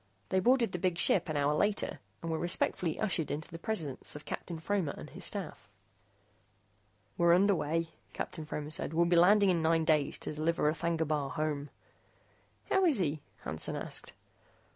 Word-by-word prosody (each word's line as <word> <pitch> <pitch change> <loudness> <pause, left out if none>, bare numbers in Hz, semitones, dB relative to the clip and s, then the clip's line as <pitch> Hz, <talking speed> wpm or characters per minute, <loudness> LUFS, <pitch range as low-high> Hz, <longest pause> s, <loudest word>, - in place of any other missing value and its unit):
They 190 - +2
boarded 240 +1 +3
the 180 - -4
big 180 -1 0
ship 175 - +5
an 155 - -1
hour 145 +1 +2
later 205 +7 0 0.2
and 165 - -3
were 160 - -1
respectfully 175 -1 +1
ushered 180 -7 0
into 150 +2 -4
the 165 - -7
presence 165 - -3
of 150 - -9
Captain 170 - -5
Fromer 175 -3 -1
and - - -9
his - - -5
staff. - - -4 1.5
"We're 170 0 +6
underway," 165 -4 +1 0.2
Captain 160 - -5
Fromer 150 -1 -5
said. 155 0 -2
"We'll 170 +1 +4
be 175 +1 +2
landing 195 +3 +6
in 170 -2 +1
nine 160 0 +2
days 150 -3 +2
to - - -4
deliver 155 0 0
R'thagna 165 -1 -1
Bar 145 -3 -1
home." 150 -1 -2 1.0
"How 385 - +4
is 310 -8 +4
he?" 155 -5 -1 0.2
Hansen 75 +2 -2
asked. - - -5
165 Hz, 170 wpm, -31 LUFS, 150-185 Hz, 1.5 s, We're